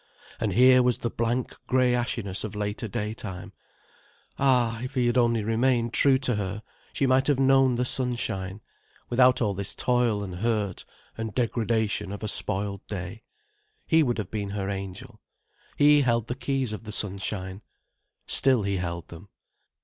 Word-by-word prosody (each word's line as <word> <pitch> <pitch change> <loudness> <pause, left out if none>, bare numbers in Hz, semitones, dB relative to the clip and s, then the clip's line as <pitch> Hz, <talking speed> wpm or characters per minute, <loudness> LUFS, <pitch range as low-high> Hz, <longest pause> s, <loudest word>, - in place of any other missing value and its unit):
And - - -1
here 130 +1 +6
was 125 -1 +2
the 120 - -3
blank 120 +2 -1
grey 130 -1 +3
ashiness 115 -5 -2
of 110 -1 -6
later 105 +2 -3
daytime. 105 -2 -5 0.9
Ah, 125 -4 +2
if 130 +2 -6
he 125 -2 +2
had 120 0 +1
only 115 -3 +2
remained 115 +1 +1
true 135 -2 +4
to 130 -4 0
her, 105 +1 -4 0.3
she 140 - 0
might 130 0 +3
have 145 -3 +2
known 135 -1 +4
the 125 +1 0
sunshine, 110 -7 0 0.5
without 125 0 +4
all 105 -2 0
this 100 +1 -3
toil 120 -4 +1
and 90 -3 -6
hurt 105 -2 -1 0.3
and 110 -2 -4
degradation 110 -4 0
of 100 +1 -7
a - - -1
spoiled 100 -1 -3
day. 100 +2 -6 0.6
He 160 -1 +4
would 125 -5 +1
have 105 -5 -5
been 105 -2 -3
her 100 -1 -3
angel. 100 +4 -7 0.6
He 145 0 +6
held 115 -4 +1
the 120 - -3
keys 135 -3 -2
of 105 - -7
the 110 - -7
sunshine. 95 -1 -3 0.6
Still 130 -5 +2
he 100 -1 -1
held 85 -2 -4
them. 85 +4 -12
115 Hz, 165 wpm, -26 LUFS, 100-125 Hz, 0.9 s, here